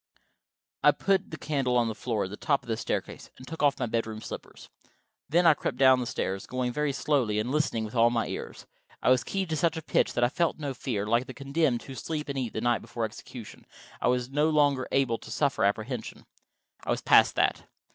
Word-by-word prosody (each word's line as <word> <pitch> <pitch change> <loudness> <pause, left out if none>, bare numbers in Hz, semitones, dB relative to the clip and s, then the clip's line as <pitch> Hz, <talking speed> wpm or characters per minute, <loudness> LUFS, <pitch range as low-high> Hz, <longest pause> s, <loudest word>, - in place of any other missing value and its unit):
I - - +7
put 195 -1 +1
the 155 - -7
candle 135 -6 0
on 120 -1 +3
the 110 - -2
floor 110 -1 -2
at 95 - -5
the - - -5
top 140 +5 0
of - - -18
the 115 - 0
staircase - - -4
and 130 - -12
took 160 -2 -6
off 145 -2 +3
my 130 - -1
bedroom 110 -1 -2
slippers. - - -9 0.6
Then 175 +4 +3
I 165 - +8
crept - - -4
down 130 -1 +6
the 125 - -3
stairs, 95 -3 -3
going 125 -1 -2
very 150 0 0
slowly, 130 -5 0
and 110 +4 -1
listening 140 -7 0
with 110 - -8
all 115 -1 +5
my 115 -1 0
ears. - - -7 0.4
I - - +4
was 130 - +4
keyed 190 -4 -3
to - - +1
such 165 +2 +1
a 160 - -5
pitch - - +1
that 120 - +1
I 120 - +4
felt 170 +4 0
no 145 -3 -4
fear: 115 -6 -3
like 115 +4 +1
the 130 - -8
condemned 140 -2 0
who 135 - -9
sleep 150 +4 -4
and 140 - -3
eat 120 -4 -3
the 110 - -3
night 120 0 +1
before 115 -2 -3
execution, 110 +1 -10 0.3
I - - +1
was 125 +1 0
no 150 +3 +2
longer 145 -4 +2
able 130 -4 +1
to - - -12
suffer 140 -6 0
apprehension. 110 +4 -2 0.6
I - - -8
was - - 0
past - - +5
that. - - +1
130 Hz, 230 wpm, -28 LUFS, 115-150 Hz, 0.6 s, I